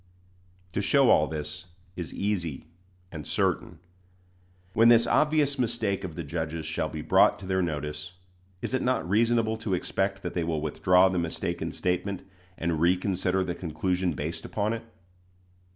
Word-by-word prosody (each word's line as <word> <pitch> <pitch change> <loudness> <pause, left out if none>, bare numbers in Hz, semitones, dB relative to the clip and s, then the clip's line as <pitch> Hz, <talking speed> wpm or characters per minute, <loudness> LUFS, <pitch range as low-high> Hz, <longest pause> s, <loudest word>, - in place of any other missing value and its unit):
To 100 - 0
show 135 +5 +4
all 75 - +5
this 75 +1 -5 0.3
is 85 -3 -5
easy 90 -9 -2 0.5
and 75 -3 -7
certain. - - 0 1.0
When 115 +3 +6
this 115 -1 +6
obvious 150 -2 +2
mistake 110 -5 0
of 90 -4 -6
the 85 - -4
judges 80 +1 -4
shall 80 - -2
be - - -6
brought - - +5
to 100 - -10
their 95 0 +1
notice, 75 0 -3 0.5
is - - -2
it 130 - +1
not 125 -10 0
reasonable 110 +2 +2
to 110 -4 -1
expect 95 +2 -1
that - - -4
they 85 - 0
will 80 -1 -1
withdraw 90 +5 +4
the 90 -1 0
mistaken 85 -1 -3
statement, 90 +2 -2 0.3
and 80 -1 -1
reconsider 90 +1 +2
the 90 -1 -2
conclusion 90 +1 -1
based 75 +3 -4
upon 105 +1 -1
it? 115 0 -5
90 Hz, 155 wpm, -27 LUFS, 80-105 Hz, 1.0 s, When